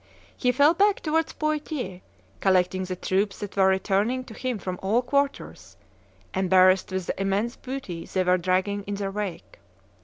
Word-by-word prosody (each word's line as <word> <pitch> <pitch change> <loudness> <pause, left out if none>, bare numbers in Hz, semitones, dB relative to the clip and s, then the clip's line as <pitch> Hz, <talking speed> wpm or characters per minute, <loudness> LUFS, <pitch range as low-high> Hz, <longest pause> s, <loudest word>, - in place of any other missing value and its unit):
He 250 - +1
fell 290 +5 +5
back 400 +3 +2
towards 320 +1 0
Poitiers, 305 - -3 0.4
collecting 185 0 +2
the 185 0 -4
troops 195 +3 -1
that 205 -1 -7
were 190 -1 +4
returning 200 +6 +1
to 240 - -11
him 255 0 -3
from 185 -2 -5
all 220 +6 +1
quarters, 280 +2 -2 0.6
embarrassed 185 0 +4
with 185 -1 -2
the - - -3
immense 200 +5 0
booty 255 -11 -6
they 185 - 0
were 180 0 +3
dragging 185 +3 0
in 205 - -3
their 200 -1 -3
wake. 200 -3 -6
200 Hz, 160 wpm, -25 LUFS, 185-255 Hz, 0.6 s, fell